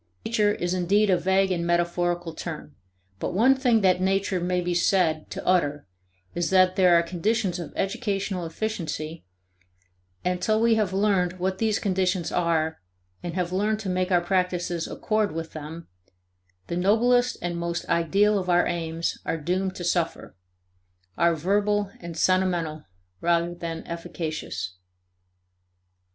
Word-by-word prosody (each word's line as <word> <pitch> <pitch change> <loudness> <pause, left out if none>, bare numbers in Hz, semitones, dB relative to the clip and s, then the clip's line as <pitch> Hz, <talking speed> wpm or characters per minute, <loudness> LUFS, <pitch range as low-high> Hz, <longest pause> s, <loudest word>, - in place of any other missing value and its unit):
"Nature" 210 -2 +2
is 175 -3 -2
indeed 195 +3 +2
a - - +5
vague 190 +1 +2
and 170 -2 0
metaphorical 175 0 0
term, 155 -3 -7 0.4
but - - -3
one 245 +7 +5
thing 250 -4 +2
that 185 -2 +3
"Nature" 195 0 +1
may 180 +1 0
be 175 0 -1
said 170 -3 +2
to - - -6
utter 150 -5 +1 0.5
is 175 -1 -1
that 185 -1 +4
there 180 -3 +5
are 170 - +5
conditions 185 +2 -1
of 165 -4 -6
educational 195 -3 -2
efficiency, 165 -4 -4 1.0
and 180 0 0
that - - -9
till 215 0 +2
we 230 0 +4
have 215 -4 +1
learned 190 -2 +2
what 185 +1 -2
these 220 -2 +2
conditions 185 -3 0
are 160 -2 0 0.4
and 175 -1 -5
have 180 -1 -1
learned 210 +3 0
to 205 -3 -4
make 185 0 0
our 175 -1 +4
practices 180 -2 -1
accord 215 -5 -1
with 165 0 -5
them, 160 +2 -8 0.8
the 170 - -4
noblest 240 +7 +3
and 175 0 -3
most 170 0 -3
ideal 195 +5 +3
of 185 -1 -4
our 175 0 +4
aims 165 -1 -2
are - - -2
doomed 185 +4 -1
to 175 - -6
suffer 170 -1 -1 0.8
are 170 0 +3
verbal 205 +4 +1
and 170 -1 -8
sentimental 175 -4 +1 0.4
rather 170 0 +1
than 165 -1 -6
efficacious. 160 - -5
180 Hz, 150 wpm, -25 LUFS, 170-195 Hz, 1.0 s, a